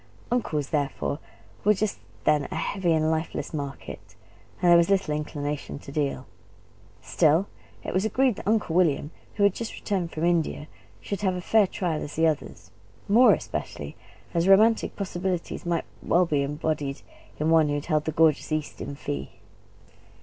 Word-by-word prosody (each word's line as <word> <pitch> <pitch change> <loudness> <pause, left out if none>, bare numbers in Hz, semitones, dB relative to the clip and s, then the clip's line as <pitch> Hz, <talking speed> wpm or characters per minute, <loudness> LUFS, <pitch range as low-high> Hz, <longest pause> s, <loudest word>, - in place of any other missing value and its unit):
Uncles, 155 - -1
therefore, 145 -1 -1 0.4
were 210 +1 +4
just 210 +1 -2 0.2
then 150 -2 +2
a - - -5
heavy 190 -4 -1
and 160 0 +2
lifeless 160 -2 -3
market, 140 -2 -7 0.4
and 175 - +4
there - - +9
was 170 +1 +3
little 195 -6 +2
inclination 150 -1 -4
to 140 - -11
deal. 140 -3 -2 0.8
Still 160 +3 +3 0.4
it - - -4
was 185 - +1
agreed 250 +2 +2
that - - -8
Uncle 210 -6 +1
William, 160 -4 +2 0.2
who 205 - +1
had 200 -2 +5
just 230 +1 -5
returned 185 -5 -2
from 160 +1 -2
India, 165 -3 0 0.3
should 200 -1 -4
have 190 -2 +1
as 180 - -5
fair 220 +1 +4
a - - -6
trial 175 -4 -2
as 145 - -6
the 160 - +3
others; 155 -3 -2 0.4
more 235 +5 +7
especially - - -6 0.4
as 170 +1 +1
romantic 215 +4 +5
possibilities 185 -3 -3
might 170 -1 0 0.2
well 180 +2 +3
be 150 -4 +1
embodied 145 0 -2 0.4
in 155 +2 +1
one 160 -2 +5
who 145 - 0
had 145 - -3
held 155 -3 +1
the 160 - -1
gorgeous 155 -1 +2
East 155 -1 -3
in 140 - -5
fee. 70 - -4
165 Hz, 170 wpm, -26 LUFS, 150-190 Hz, 0.8 s, there